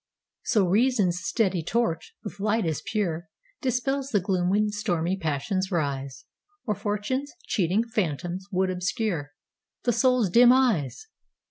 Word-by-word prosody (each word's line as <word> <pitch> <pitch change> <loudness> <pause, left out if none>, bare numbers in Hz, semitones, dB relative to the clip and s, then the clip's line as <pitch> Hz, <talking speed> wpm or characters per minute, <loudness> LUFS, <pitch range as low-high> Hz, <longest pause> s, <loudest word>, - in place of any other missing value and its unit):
So 205 -5 +2
Reason's 200 -3 +2
steady 185 0 0
torch, 175 -2 -1
with 205 -1 -8
light 215 +1 +1
as 160 -2 -1
pure, 195 -6 -2 0.3
Dispels 270 +1 -1
the 210 - +2
gloom 180 -1 0
when 210 +2 +2
stormy 180 -4 -1
passions 170 +3 -1
rise, 140 -6 -2 0.4
Or 215 - +1
Fortune's 210 +8 -2
cheating 195 +2 +1
phantoms 185 -4 -3
would 185 0 +1
obscureThe 180 - -4
soul's 250 -5 +3
dim 240 +4 +7
eyes! 250 - +2
195 Hz, 125 wpm, -26 LUFS, 175-230 Hz, 0.4 s, dim